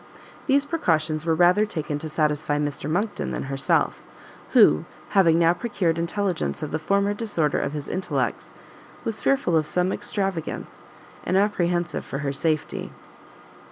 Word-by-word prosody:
These 280 +1 +3
precautions 160 - 0
were 165 - +3
rather 180 +5 +5
taken 155 -8 -3
to 155 +1 -6
satisfy 150 -1 0
Mr 145 0 -2
Monckton 200 +7 -1
than - - -3
herself, 135 0 0 0.5
who, 75 +1 +6 0.2
having 170 -5 +4
now 170 0 +4
procured 175 -4 -1
intelligence 175 -1 -1
of 150 - -4
the 155 - -1
former 200 +5 +1
disorder 205 -9 0
of 140 - -2
his 145 -2 -5
intellects, 145 -9 -2 0.5
was 225 -2 -3
fearful 270 -11 +2
of 155 -1 +2
some 180 +3 0
extravagance, 195 -5 -3 0.4
and 185 - +1
apprehensive 175 -4 0
for - - -5
her 140 - -1
safety. 155 +1 -2
170 Hz, 145 wpm, -24 LUFS, 155-200 Hz, 0.5 s, who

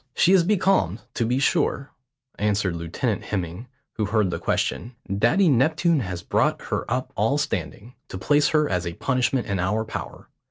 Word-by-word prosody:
"She 185 - +4
is 185 -3 +5
becalmed, 190 - +1
to 115 - -1
be 125 +2 +1
sure," 140 -1 0 0.5
answered 105 -3 0
Lieutenant 85 +7 -3
Hemming, 95 +3 -4 0.3
who 110 - 0
heard 105 -3 +1
the - - -3
question. 120 +2 -2 0.2
"Daddy 120 - +3
Neptune 160 +4 +3
has 90 -6 -5
brought - - +1
her - - -2
up - - -2
all - - +1
standing, 120 +5 -4
to - - -7
place 145 +10 +3
her 155 -2 +2
as 90 -1 -1
a 85 - -4
punishment 125 +3 0
in 100 -2 -2
our 105 +5 0
power. 110 - -7
115 Hz, 170 wpm, -24 LUFS, 95-145 Hz, 0.5 s, is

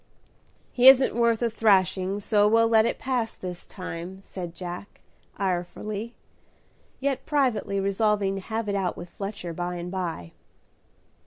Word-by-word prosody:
"He 250 +1 +4
isn't 265 0 +8
worth 235 0 +2
a 235 - +2
thrashing, 195 -2 +2
so 205 0 +3
we'll 230 +1 +4
let 225 0 +4
it - - -2
pass 245 -3 -2
this 180 -1 -7
time," 185 +1 -7
said 175 -4 -7
Jack, 180 +2 -8 0.4
irefully, 200 +4 -3 0.8
yet 275 -1 -2
privately 250 -9 +1
resolving 200 0 +1
to 195 - -4
have 220 +2 -3
it 200 - -1
out 195 -3 -1
with 175 0 -9
Fletcher 195 -4 -6
by 175 +1 -3
and 175 0 -5
by. 170 - -4
200 Hz, 145 wpm, -26 LUFS, 180-225 Hz, 0.8 s, isn't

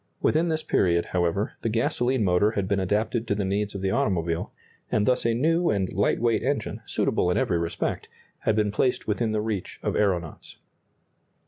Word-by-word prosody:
Within 165 +2 +2
this 160 -1 -1
period, 85 -2 +2
however, 90 +3 0
the 115 - -1
gasoline 125 +1 +1
motor 100 +3 +3
had 100 -3 -1
been 100 0 +1
adapted 110 +5 0
to 100 - +1
the 100 -1 -1
needs 100 +1 -1
of 100 - -4
the 95 - +1
automobile, 85 -4 0 0.4
and 105 - +2
thus 125 -1 +2
a 115 - +1
new 165 +7 +2
and 95 -3 0
light 100 - +1
weight 115 -1 +2
engine, 140 +3 -2
suitable 90 - +1
in 90 - +1
every 85 -3 +1
respect, 85 0 -3 0.3
had 110 - +1
been 105 -1 +1
placed 125 +4 0
within 110 +1 0
the 110 0 0
reach 105 -4 -4
of - - -1
aeronauts. 90 -6 -1
105 Hz, 190 wpm, -25 LUFS, 95-115 Hz, 0.4 s, motor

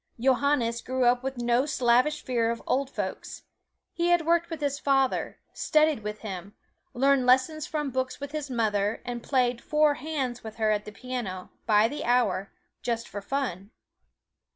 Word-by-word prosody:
Johannes 255 -2 +2
grew 260 0 0
up 245 0 +4
with 265 0 -4
no 240 +3 +2
slavish 255 +2 +2
fear 235 -3 +1
of 230 0 -3
"old 270 +1 0
folks." - - -5 0.5
He 340 0 0
had 345 -2 +3
worked 335 0 +2
with 325 -3 -5
his 285 -1 -1
father, 270 -2 +1 0.2
studied 310 -3 +2
with 210 0 -5
him; 195 -1 -7 0.4
learned 270 0 +3
lessons 265 +5 +3
from 295 -3 -2
books 260 0 -2
with 285 0 -6
his 300 -2 -4
mother, 215 -3 0
and 240 -1 -4
played 245 -2 +1
"four 300 -1 +3
hands" 285 -5 -3
with 220 -1 -8
her 220 -2 +1
at 210 0 0
the 210 - -7
piano, 210 -5 -5 0.2
by 215 0 +5
the 290 +5 -5
hour, 215 -6 +1 0.3
just 235 -1 -2
for 205 +1 -6
fun. 200 -5 -3
250 Hz, 170 wpm, -27 LUFS, 230-285 Hz, 0.5 s, by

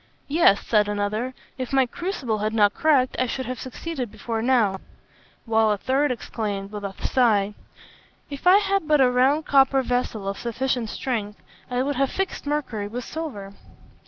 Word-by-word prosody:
'Yes,' 285 -10 +4
said 210 -2 +3
another, 210 +5 -2 0.2
'if 255 -2 -4
my 270 -1 +4
crucible 255 - -3
had 215 +1 -1
not 205 -2 +4
cracked, 280 -5 +2
I 255 - +2
should 260 +2 -3
have 255 -1 -5
succeeded 260 -2 -5
before 225 +1 -4
now;' 225 -6 +2 0.7
while 220 -1 +3
a 210 - +1
third 270 +7 +1
exclaimed, 205 -4 -4
with 210 -1 -6
a 200 -1 -4
sigh, 210 -5 +2 0.7
'If 280 +4 -5
I 370 +2 +8
had 395 -4 0
but 300 -1 +4
had 265 - +6
a 250 - +2
round 270 +5 +3
copper 270 -1 +4
vessel 245 -5 -2
of 195 - -3
sufficient 240 -1 -2
strength, 210 -5 -3 0.3
I 250 0 0
would 285 -1 -2
have 275 0 +2
fixed 385 -6 -3
mercury 265 -9 -2
with 240 +4 -5
silver.' 245 -12 -6
250 Hz, 175 wpm, -24 LUFS, 210-275 Hz, 0.7 s, I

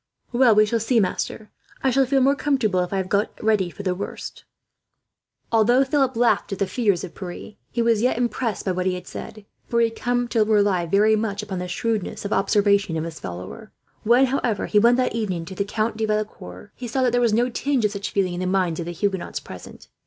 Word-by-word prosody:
"Well, 240 -2 +5
we 215 0 +6
shall 230 +2 0
see, 230 +2 +2
master. 210 +2 -2 0.3
I 265 - +3
shall 265 +1 +3
feel 270 +1 +2
more 270 +2 +4
comfortable 255 -10 +1
if 180 -1 -1
I 195 - -1
have 190 -1 -2
got 205 +2 +1
ready 215 -4 +1
for 200 - -9
the 185 -2 0
worst." 190 +3 -7 1.1
Although 235 +4 +4
Philip 270 -2 +1
laughed 235 -2 +2
at 195 - -3
the 195 - +1
fears 200 -2 0
of 180 - -7
Pierre, 185 +3 -8 0.2
he 235 - -1
was 230 -2 +2
yet 250 -1 +1
impressed 240 -2 -2
by 190 - +1
what 185 0 -1
he 185 - +1
had 180 - -8
said; 215 -1 -9 0.2
for 235 - +1
he 230 -1 +3
had 225 - -14
come 245 0 0
to 225 -2 +3
rely 205 -5 +2
very 210 +5 +4
much 210 -1 -2
upon 190 -3 -5
the 180 - -4
shrewdness 210 +2 -3
of 200 - -1
observation 200 -3 +2
of 160 - -2
his 165 -1 -7
follower. 90 - -8 0.3
When, 240 +4 +4
however, 245 -5 -1
he 210 - +3
went 235 +3 +5
that 255 -3 +1
evening 190 -7 -2
to 190 - -8
the 200 - -1
Count 215 +1 -2
de 220 - 0
Valecourt's, 210 - -4
he 250 - -7
saw 260 +3 0
that 250 - +3
there 245 +1 +2
was 235 -2 +3
no 240 +4 +2
tinge 270 -2 0
of 210 - +1
such 200 -1 -4
feeling 190 -3 0
in 175 - -4
the 185 - -2
minds 185 -3 0
of 170 - -4
the 175 - -4
Huguenots 190 -3 -2
present. 95 -10 -12
215 Hz, 235 wpm, -23 LUFS, 190-235 Hz, 1.1 s, we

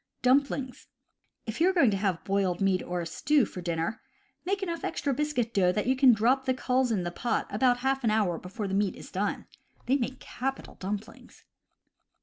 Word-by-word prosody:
Dumplings. 265 0 +1 0.3
— - - -50
If 225 +6 -5
you 355 - +6
are - - +1
going 280 - +4
to 195 - 0
have 190 -4 -1
boiled 195 -3 0
meat 195 -2 +2
or 180 0 -3
a - - -4
stew 270 - +2
for 185 - -8
dinner, 170 +6 -2 0.4
make 395 +2 -1
enough 335 -3 -3
extra 280 - -1
biscuit 260 -5 -1
dough 190 -3 +3
so 180 - +3
that 210 - -1
you 260 +2 +2
can 260 -1 +7
drop 245 +4 +2
the 260 - +1
culls 255 0 +1
into 205 -6 0
the 175 - -3
pot 235 +7 -1
about 245 +3 +2
half 270 0 +1
an 225 - +3
hour 205 -6 +1
before 200 +3 -5
the 190 - -4
meat 200 -1 +1
is - - -11
done. 200 +2 -2 0.4
They 265 +3 +3
make 260 0 -3
capital 270 +2 -5
dumplings. 205 +3 -7
230 Hz, 210 wpm, -28 LUFS, 195-265 Hz, 0.4 s, can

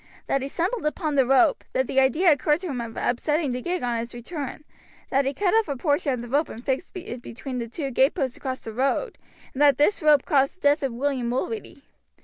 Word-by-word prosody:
That 275 - 0
he 270 - -3
stumbled 370 - -2
upon 305 0 -2
the 270 -3 +3
rope, 270 +4 +4
that 260 - +1
the 265 - +1
idea 305 +7 +4
occurred 300 +2 +2
to 370 - -4
him 255 -4 -3
of 230 -1 -7
upsetting 295 +4 0
the 250 +1 -3
gig 355 +3 -2
on 240 -1 0
its 235 +1 -6
return, 280 +3 -6 0.5
that 275 0 +2
he 275 - 0
cut 390 -3 +1
off 450 -3 +3
a 285 - -2
portion 290 +1 +1
of 250 -2 -3
the - - -7
rope 285 +6 +1
and 230 +3 -9
fixed 270 +7 -1
it 250 -9 -7
between 250 +2 -6
the 235 - -4
two 275 +3 -4
gateposts 260 0 +1
across 260 -1 -5
the 225 - -7
road, 275 - -1 0.3
and 265 - -4
that 285 -3 +6
this 330 +8 +2
rope 300 -3 +5
caused 275 +1 +2
the 370 - -33
death 290 +1 +3
of 270 -2 -1
William 255 0 -1
Mulready. 320 - -4
275 Hz, 235 wpm, -25 LUFS, 250-310 Hz, 0.5 s, that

